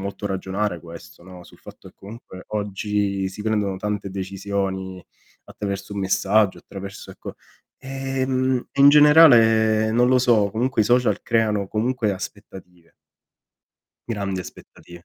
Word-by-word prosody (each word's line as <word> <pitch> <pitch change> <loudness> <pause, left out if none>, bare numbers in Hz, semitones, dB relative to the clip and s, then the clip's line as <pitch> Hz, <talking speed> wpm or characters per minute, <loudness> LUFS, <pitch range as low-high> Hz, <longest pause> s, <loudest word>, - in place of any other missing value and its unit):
molto 100 +1 -5
ragionare 95 -1 -3
questo, 85 -1 -13
no, 90 -1 -13
sul - - -18
fatto - - -14
che - - -21
comunque 100 -3 -12
oggi 100 -1 -2
si 95 +2 -10
prendono 105 -3 -1
tante 105 -1 -4
decisioni 95 -1 -4 0.4
attraverso 100 0 -6
un 100 - -3
messaggio, 100 +1 +1
attraverso, 100 0 -10
ecco - - -10 0.4
ehm, 130 -1 -2
e 140 - -3
in 140 - +8
generale 115 -8 +6
non 120 +1 +3
lo 130 0 +4
so, 115 -5 +2
comunque 115 +3 -1
i - - -1
social 125 +2 +2
creano 110 -4 0
comunque 110 -1 -1
aspettative. 95 -3 -10 1.2
Grandi 100 -4 -3
aspettative. 85 -1 -13
105 Hz, 130 wpm, -22 LUFS, 95-115 Hz, 1.2 s, in